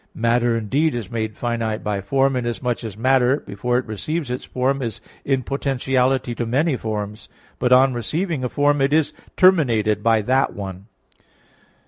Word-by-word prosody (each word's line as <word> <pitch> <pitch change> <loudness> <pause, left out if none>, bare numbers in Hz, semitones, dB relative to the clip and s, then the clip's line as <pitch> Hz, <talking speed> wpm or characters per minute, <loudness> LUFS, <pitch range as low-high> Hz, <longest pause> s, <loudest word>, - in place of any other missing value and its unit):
Matter 115 0 +2
indeed 135 +7 0
is 115 -6 -5
made 110 -2 -3
finite 115 -2 -2
by 105 -2 -2
form, 135 +5 +1
inasmuch 120 0 -2
as 105 -3 -6
matter, 130 +3 +3
before 120 +5 -2
it 125 - -2
receives 135 - -3
its 125 - -4
form, 135 +2 -1
is 115 -2 -4 0.2
in 135 -2 0
potentiality 135 -2 0
to 120 - -3
many 140 +5 +1
forms; 105 -2 -5 0.3
but 125 0 +1
on 130 +1 +6
receiving 155 - -2
a 125 - -1
form, 145 +1 +2
it 135 +2 +2
is 155 -1 +2 0.2
terminated 115 - +4
by 115 -1 +3
that 130 +5 +1
one. 95 0 -7
125 Hz, 160 wpm, -21 LUFS, 110-135 Hz, 0.3 s, on